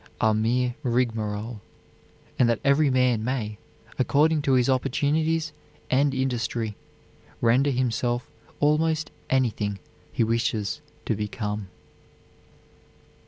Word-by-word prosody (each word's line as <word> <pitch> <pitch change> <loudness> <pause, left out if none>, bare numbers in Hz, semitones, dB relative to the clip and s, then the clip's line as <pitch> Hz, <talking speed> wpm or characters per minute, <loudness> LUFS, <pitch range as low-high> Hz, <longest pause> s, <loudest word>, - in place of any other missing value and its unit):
are 110 0 +3
mere 120 +3 +1
rigmarole, 115 -3 -1 0.8
and 120 -2 +5
that 115 - +1
every 140 +1 +4
man 125 -4 +2
may, 110 -4 -2 0.4
according 150 +4 +3
to 140 -2 +1
his 125 -2 +4
opportunities 155 +5 +1 0.4
and 135 +1 +3
industry, 120 -4 -1 0.6
render 125 +5 +3
himself 120 -1 0 0.3
almost 155 +1 +2 0.2
anything 110 -6 +1 0.3
he - - +1
wishes 115 -2 -1 0.2
to - - 0
become." 105 -1 -3
125 Hz, 100 wpm, -25 LUFS, 110-135 Hz, 0.8 s, and